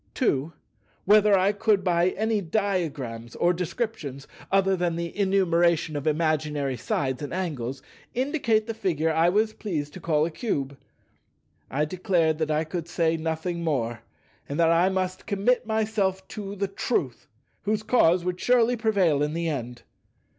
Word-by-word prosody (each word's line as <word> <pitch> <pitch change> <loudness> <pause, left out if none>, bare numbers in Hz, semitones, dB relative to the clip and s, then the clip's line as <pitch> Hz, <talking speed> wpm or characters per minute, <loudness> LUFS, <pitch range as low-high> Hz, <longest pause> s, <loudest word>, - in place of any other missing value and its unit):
2. 155 - +1 0.5
Whether 210 0 +6
I 190 +2 +3
could 210 -1 +1
by 175 0 +3
any 220 -1 +1
diagrams 160 - -2
or 175 +1 +2
descriptions 175 - -4 0.2
(other 195 0 +3
than 175 -2 -1
the 170 0 -4
enumeration 175 -5 +2
of 145 +1 -3
imaginary 150 -3 0
sides 130 +2 -2
and 145 - -5
angles) 140 -8 -3 0.3
indicate 250 -5 +1
the 225 - -4
Figure 165 -7 0
I 165 +2 +4
was 215 +4 +1
pleased 155 -10 -4
to - - -8
call 155 -3 +1
a 170 - -3
Cube? 140 - -2 0.9
I 145 +4 0
declared 165 -2 +1
that 155 -1 0
I 155 +1 +1
could 165 +1 -5
say 165 -1 +1
nothing 165 +2 -3
more, 120 -8 -1 0.5
and 140 - -3
that 165 -1 +4
I 170 +3 +4
must 185 -1 -3
commit 220 +4 +1
myself 210 -4 0
to 200 -2 -6
the 200 0 -1
Truth, 160 - -2 0.3
whose 215 +1 -1
cause 185 -7 +3
would 180 0 -2
surely 245 +1 +3
prevail 200 -10 +2
in 150 +1 0
the 170 0 -1
end. 125 -4 -5
175 Hz, 155 wpm, -26 LUFS, 155-200 Hz, 0.9 s, Whether